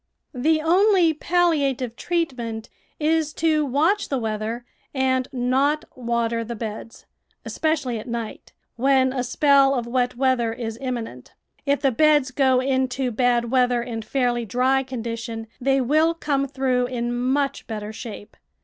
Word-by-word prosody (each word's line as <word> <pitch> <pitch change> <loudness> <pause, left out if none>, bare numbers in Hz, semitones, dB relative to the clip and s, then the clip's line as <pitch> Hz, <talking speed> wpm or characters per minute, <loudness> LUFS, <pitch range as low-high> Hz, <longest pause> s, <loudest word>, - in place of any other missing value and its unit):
The 310 +5 +2
only 360 0 +4
palliative 290 -8 +1
treatment 245 -10 -3 0.3
is 310 0 +1
to 310 -2 +1
watch 310 +10 +1
the 275 - 0
weather 225 +1 -3 0.3
and 260 -1 +1
not 265 +4 +1
water 235 -2 -1
the 235 +1 -6
beds, 220 0 -7 0.4
especially 295 -7 -1
at 215 - -10
night, 235 -2 -6 0.3
when 260 +1 +3
a 255 -2 -1
spell 275 +1 +4
of 240 -2 -2
wet 245 +1 0
weather 250 -3 +1
is 230 -1 -5
imminent; 235 - -5 0.3
if 280 0 +2
the 270 - +3
beds 295 +1 +3
go 260 -1 +3
into 260 -1 0
bad 240 0 +1
weather 250 -2 +2
in 230 -2 -5
fairly 245 0 0
dry 255 +4 +1
condition 230 -3 -5
they 270 +1 +2
will 310 +6 +2
come 280 -4 -1
through 260 -2 0
in 240 -1 -3
much 270 +3 -1
better 215 -2 -5
shape. 220 -2 -9
255 Hz, 140 wpm, -23 LUFS, 235-280 Hz, 0.4 s, only